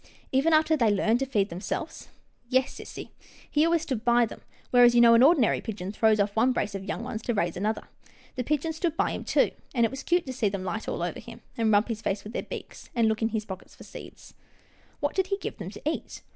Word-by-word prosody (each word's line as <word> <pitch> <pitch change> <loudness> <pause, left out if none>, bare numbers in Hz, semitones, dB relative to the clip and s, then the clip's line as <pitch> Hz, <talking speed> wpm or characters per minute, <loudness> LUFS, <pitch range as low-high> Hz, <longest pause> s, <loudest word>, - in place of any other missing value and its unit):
" - - -30
Even 275 +5 +3
after 315 0 +4
they 235 -7 +3
learned 220 +3 +2
to 270 - -1
feed 210 -6 +1
themselves? 190 - -5 0.2
" - - -41
" 240 - -38
Yes, 260 +1 +2
sissy, - - -8 0.4
he 300 - +3
always 335 0 +2
stood 260 -8 -3
by 240 0 +4
them, 220 - -10 0.3
whereas 245 -1 +6
you - - +6
know 235 -1 +8
an 230 - +6
ordinary 275 -4 +4
pigeon 200 -4 -5
throws 215 0 +3
off 200 0 0
one 245 +3 +3
brace 205 -4 -2
of 195 -1 -5
young 210 +3 -4
ones 225 -3 -5
to 240 +1 -2
raise 175 -4 0
another. 210 +4 -2 0.5
The 250 - -2
pigeons 305 +4 -1
stood 330 -1 -1
by - - +1
him, - - -5
too, - - +2 0.2
and 235 -2 +4
it 225 - -1
was 270 - -6
cute 350 0 +1
to 260 - -5
see 235 -5 +1
them 195 -1 -4
light 215 +4 -4
all - - -2
over - - -3
him, - - -11
and 225 -3 +1
rub 205 +1 +4
his 225 -2 -4
face 200 -1 -2
with 215 - -9
their - - -2
beaks, - - -9
and 230 -2 +3
look 220 0 0
in 225 - +2
his 220 -1 -3
pockets 190 -3 -9
for - - -13
seeds." - - -12 0.3
" - - -33
What - - 0
did 380 -1 0
he 395 0 -1
give - - -6
them 185 -2 -5
to 205 - -11
eat 315 - -4
230 Hz, 265 wpm, -27 LUFS, 210-270 Hz, 0.5 s, know